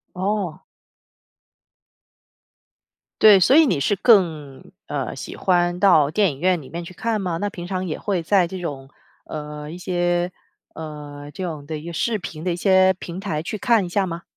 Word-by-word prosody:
哦。 190 Hz, -3 st, -2 dB, 2.6 s
对， 205 Hz, -3 st, +8 dB
所 255 Hz, +10 st, +5 dB
以 320 Hz, -1 st, +7 dB
你 155 Hz, -, +1 dB
是 145 Hz, +9 st, +1 dB
更， 165 Hz, -, +2 dB, 0.2 s
呃， -, -, -3 dB
喜 -, -, -7 dB
欢 175 Hz, -1 st, +1 dB
到 165 Hz, -7 st, +5 dB
电 195 Hz, +2 st, +2 dB
影 135 Hz, -, -11 dB
院 180 Hz, +1 st, +2 dB
里 135 Hz, -, -12 dB
面 170 Hz, +1 st, -5 dB
去 170 Hz, -, -10 dB
看 220 Hz, +3 st, -2 dB
吗？ 175 Hz, -3 st, -2 dB
那 205 Hz, +2 st, -2 dB
平 175 Hz, -2 st, -7 dB
常 185 Hz, -1 st, -3 dB
也 155 Hz, -, -4 dB
会 190 Hz, -5 st, -1 dB
在 185 Hz, 0 st, +3 dB
这 190 Hz, +2 st, -7 dB
种 140 Hz, -6 st, -6 dB, 0.4 s
呃， 150 Hz, -1 st, -7 dB
一 170 Hz, -, -7 dB
些， 175 Hz, -1 st, 0 dB, 0.4 s
呃， 145 Hz, -2 st, -8 dB
这 190 Hz, -, -6 dB
种 160 Hz, -5 st, -5 dB
的 155 Hz, -, -4 dB
一 150 Hz, -, -10 dB
个 170 Hz, -, -6 dB
视 220 Hz, +6 st, 0 dB
频 165 Hz, -4 st, -8 dB
的 180 Hz, -, 0 dB
一 -, -, -1 dB
些 190 Hz, +1 st, +4 dB
平 180 Hz, 0 st, -8 dB
台 160 Hz, -6 st, -3 dB
去 210 Hz, +5 st, -5 dB
看 230 Hz, -5 st, +3 dB
一 -, -, -5 dB
下 195 Hz, +2 st, 0 dB
吗？ 170 Hz, 0 st, -6 dB
175 Hz, 200 characters per minute, -22 LUFS, 155-195 Hz, 2.6 s, 对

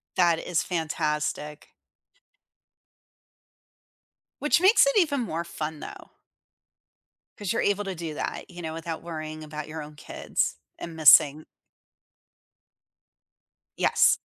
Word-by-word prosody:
That 170 Hz, -2 st, +3 dB
is 170 Hz, -3 st, -1 dB
fantastic. 150 Hz, -3 st, -3 dB, 2.7 s
Which 295 Hz, +3 st, +3 dB
makes 395 Hz, +6 st, +6 dB
it -, -, +2 dB
even 295 Hz, -8 st, +2 dB
more 170 Hz, -7 st, -3 dB
fun 155 Hz, -2 st, -5 dB
though. -, -, -10 dB, 1.3 s
'Cause 205 Hz, -3 st, -3 dB
you're 230 Hz, -, 0 dB
able 205 Hz, 0 st, +1 dB
to 195 Hz, -2 st, -5 dB
do 165 Hz, -2 st, -5 dB
that, -, -, -5 dB
you 175 Hz, -1 st, -9 dB
know, 160 Hz, -1 st, -5 dB
without 165 Hz, 0 st, -6 dB
worrying 155 Hz, -2 st, -6 dB
about 150 Hz, 0 st, -7 dB
your 155 Hz, 0 st, -6 dB
own 150 Hz, 0 st, -12 dB
kids -, -, -2 dB, 0.2 s
and 165 Hz, -1 st, -7 dB
missing 155 Hz, -1 st, +6 dB, 2.3 s
Yes. -, -, +4 dB
160 Hz, 115 wpm, -26 LUFS, 155-185 Hz, 2.7 s, makes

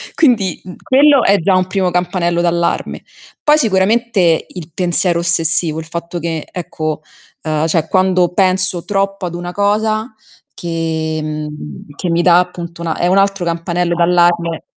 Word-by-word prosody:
Quindi, 225 Hz, -, +2 dB
mh, 180 Hz, -1 st, -10 dB
quello 280 Hz, 0 st, +4 dB
è 200 Hz, +1 st, +4 dB
già 185 Hz, +3 st, +2 dB
un 185 Hz, 0 st, +1 dB
primo 185 Hz, -2 st, -1 dB
campanello 175 Hz, -1 st, 0 dB
d'allarme. 170 Hz, 0 st, -1 dB, 0.4 s
Poi 300 Hz, 0 st, +4 dB
sicuramente 200 Hz, -, +2 dB
il 170 Hz, -3 st, -10 dB
pensiero 175 Hz, -1 st, +1 dB
ossessivo, 165 Hz, -2 st, +2 dB
il 160 Hz, -, -7 dB
fatto 170 Hz, +1 st, -6 dB
che, 160 Hz, -2 st, -4 dB
ecco, 155 Hz, -3 st, -4 dB, 0.4 s
uhm, 155 Hz, 0 st, -1 dB
cioè 160 Hz, -1 st, 0 dB
quando 185 Hz, -1 st, +2 dB
penso 185 Hz, -1 st, +2 dB
troppo 195 Hz, -1 st, -2 dB
ad 175 Hz, -, -6 dB
una 175 Hz, 0 st, -5 dB
cosa 215 Hz, +3 st, 0 dB, 0.4 s
che, 160 Hz, -2 st, -3 dB
mhmm, 150 Hz, -, -7 dB
che 180 Hz, -, -4 dB
mi 170 Hz, +1 st, +1 dB
dà 175 Hz, -1 st, +5 dB
appunto 170 Hz, -1 st, -5 dB
una 165 Hz, -2 st, -3 dB
è -, -, -1 dB
un 190 Hz, +2 st, +2 dB
altro 195 Hz, -2 st, +1 dB
campanello 170 Hz, +1 st, -1 dB
d'allarme. 170 Hz, -1 st, +1 dB
175 Hz, 155 wpm, -16 LUFS, 165-190 Hz, 0.4 s, dà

